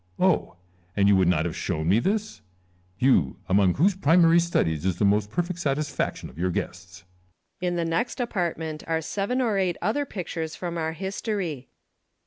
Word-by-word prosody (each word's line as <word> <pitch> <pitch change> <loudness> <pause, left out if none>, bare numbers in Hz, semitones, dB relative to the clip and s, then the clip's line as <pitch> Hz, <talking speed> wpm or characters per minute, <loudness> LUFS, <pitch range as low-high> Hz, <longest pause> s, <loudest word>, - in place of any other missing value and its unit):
Oh! 185 - +2 0.4
and 100 0 +4
you 100 - +6
would 95 -2 +3
not 85 -2 +2
have 85 - -3
shown 80 0 -2
me 100 +6 +4
this? 200 - -2 0.6
You, 95 - +3
among 95 -1 +3
whose 190 +8 +3
primary 170 -1 +5
studies 80 - 0
is 95 -2 0
the 100 - +2
most 105 +1 +2
perfect 175 - -2
satisfac 145 -1 -1
tion - - -8
of 70 - -14
your 90 +1 +1
guests! 90 +1 -5 0.6
Lucullus. 180 - +1
In - - -2
the 170 -1 0
next 165 +12 -1
apartment 170 -9 -2
are 165 -1 +1
seven 200 +9 -2
or 220 -5 +1
eight 180 -3 0
other 285 +7 -1
pictures 165 -6 -5
from 175 -2 -5
our 160 -1 -2
history. 190 - -4
160 Hz, 180 wpm, -25 LUFS, -, 0.6 s, you